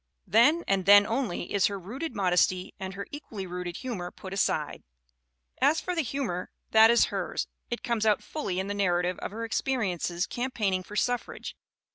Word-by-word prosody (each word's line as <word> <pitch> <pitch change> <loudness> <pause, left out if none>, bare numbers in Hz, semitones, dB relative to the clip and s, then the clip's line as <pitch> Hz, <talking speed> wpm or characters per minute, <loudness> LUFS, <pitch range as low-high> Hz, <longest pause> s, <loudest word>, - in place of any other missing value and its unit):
Then 295 +10 +4
and 195 -1 +1
then 205 0 +9
only 225 -6 -2
is 200 -2 +4
her 200 - -4
rooted 240 - -6
modesty 185 -1 +2
and 190 -1 -5
her 200 - -5
equally 225 -9 -7
rooted 180 -1 -5
humor 215 -9 -4
put 190 +1 -9
aside. 155 -6 0 0.8
As 290 +4 +4
for 360 - -3
the 335 - +1
humor 235 - -3 0.2
that 220 0 +8
is 235 0 +5
hers, - - -2 0.2
it 240 - -4
comes 235 -2 0
out 215 -2 +3
fully 195 -12 -3
in 190 - -1
the 200 - -3
narrative 180 -2 +1
of - - -4
her 225 +3 -5
experiences 195 -8 -1
campaigning 220 -7 -1
for 205 +3 -11
suffrage. 245 +2 -2
205 Hz, 175 wpm, -28 LUFS, 185-240 Hz, 0.8 s, then